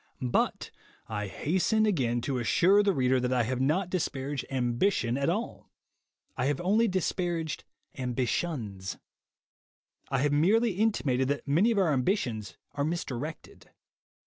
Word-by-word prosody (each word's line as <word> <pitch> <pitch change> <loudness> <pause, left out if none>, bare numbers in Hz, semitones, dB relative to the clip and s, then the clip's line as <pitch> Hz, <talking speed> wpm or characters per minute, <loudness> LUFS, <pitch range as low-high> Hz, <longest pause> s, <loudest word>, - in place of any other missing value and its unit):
But - - 0 0.4
I 105 -2 -3
hasten 190 - +1
again 125 - +1
to 130 +1 -2
assure 185 - +4
the 205 -1 +3
reader 130 -5 +2
that 125 0 -1
I 125 -2 +2
have 130 +3 -2
not 170 +7 +1
dis 185 -3 +1
paraged 135 0 -4
Ambition 120 +1 +1
at 140 +3 0
all; 215 +7 -3 0.7
I 125 +1 0
have 145 -1 0
only 210 +6 +3
disparaged 175 -4 -2 0.3
ambitions. 125 - -2 1.1
I 135 0 +1
have 145 -1 +2
merely 210 +10 +3
intimated 170 - +1
that 145 +1 -2
many 165 +11 +3
of 230 - +1
our 180 -6 +3
ambitions 125 - -1 0.2
are 140 0 -1
misdirected. 155 -2 -5
145 Hz, 140 wpm, -29 LUFS, 125-185 Hz, 1.1 s, assure